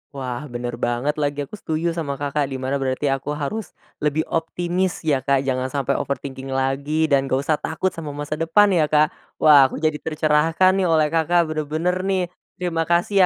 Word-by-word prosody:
Wah, 130 +1 -4
bener 120 -1 -5
banget 130 +6 -1
lagi, 145 0 -1
aku 140 - -9
setuju 160 +2 -1
sama 155 -4 -3
Kakak, 145 0 -1
di 135 - -5
mana 130 +1 -2
berarti 135 +1 0
aku 135 +2 -2
harus 155 +10 -4 0.2
lebih 150 +1 0
optimis 175 +2 -1
ya, 145 -4 +2
Kak, 135 +1 +1
jangan 130 -1 -1
sampai 135 0 -1
overthinking 135 -1 -4
lagi, 140 +4 0
dan 135 -1 +3
nggak 135 +1 0
usah 155 0 +1
takut 185 +4 -1
sama 150 -3 -7
masa 145 +1 -4
depan 195 +6 +4
ya, 160 -5 +3
Kak. 155 +2 +3 0.2
Wah, 145 -3 +7
aku - - -8
jadi 155 -1 +1
tercerahkan 160 +3 +2
nih 185 - +2
oleh 155 -2 +3
Kakak, 165 0 +2
bener-bener 155 +4 -1
nih. 190 -2 +1 0.3
Terima 165 -3 -2
kasih 175 +4 +2
150 Hz, 185 wpm, -22 LUFS, 135-165 Hz, 0.3 s, Wah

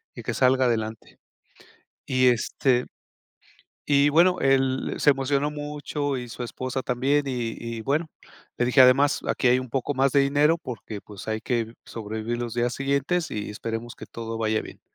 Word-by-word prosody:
y - - -7
que - - -2
salga 130 0 +3
adelante", 110 -2 -2 0.9
y 130 -1 +3
este, 125 +1 +2 1.0
y 140 0 +4
bueno, 180 +4 +4
él 135 -1 +1
se 145 - +5
emocionó 140 +1 0
mucho 145 -1 -3
y 125 -1 -6
su 120 - -7
esposa 130 +2 -4
también 135 +4 +1
y 120 -4 -2 0.2
y - - -5
bueno, 150 +7 0 0.5
le 120 - +2
dije: 125 +2 +4
"Además 135 +3 +6
aquí - - 0
hay 125 +1 +5
un 130 - -7
poco 135 +3 -1
más 135 +1 +3
de 140 - +5
dinero, 145 +4 +3
porque, 115 -7 -7
pues 105 0 -11
hay 110 0 -1
que 115 -2 -2
sobrevivir 110 +1 -4
los 120 -1 -4
días 120 0 0
siguientes 140 +5 0
y 105 -1 -4
esperemos 115 +2 -5
que - - -10
todo 115 -1 -6
vaya 110 -1 0
bien", - - -12
130 Hz, 175 wpm, -25 LUFS, 115-140 Hz, 1.0 s, Además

